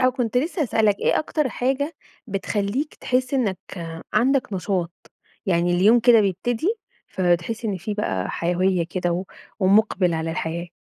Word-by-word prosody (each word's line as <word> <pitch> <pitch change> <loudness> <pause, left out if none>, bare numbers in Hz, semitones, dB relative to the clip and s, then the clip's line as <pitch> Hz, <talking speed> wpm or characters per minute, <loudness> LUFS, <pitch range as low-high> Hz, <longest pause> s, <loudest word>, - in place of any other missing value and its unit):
آه، 255 - +5
وكنت 245 -2 -2
لسه 315 +5 0
هاسألك، 215 -5 +2
إيه - - +2
أكتر 305 -2 -1
حاجة 270 +6 -1 0.3
بتخلّيك 205 +7 -2
تحس 255 +2 -1
إنك 205 -9 0 0.5
عندك 250 +1 +2
نشاط، 180 -2 -3 0.3
يعني 175 -1 +2
اليوم 210 +7 +5
كده 230 -1 +6
بيبتدي 235 - 0 0.3
فبتحس 185 +6 0
إن 205 -4 -1
في 205 +4 -4
بقى 95 - -2
حيوية 180 +1 +1
كده 175 0 -2
و 180 +3 -2 0.4
ومقبل 190 -2 +3
على 160 0 -2
الحياة؟ 170 +2 -3
205 Hz, 145 wpm, -23 LUFS, 180-250 Hz, 0.5 s, كده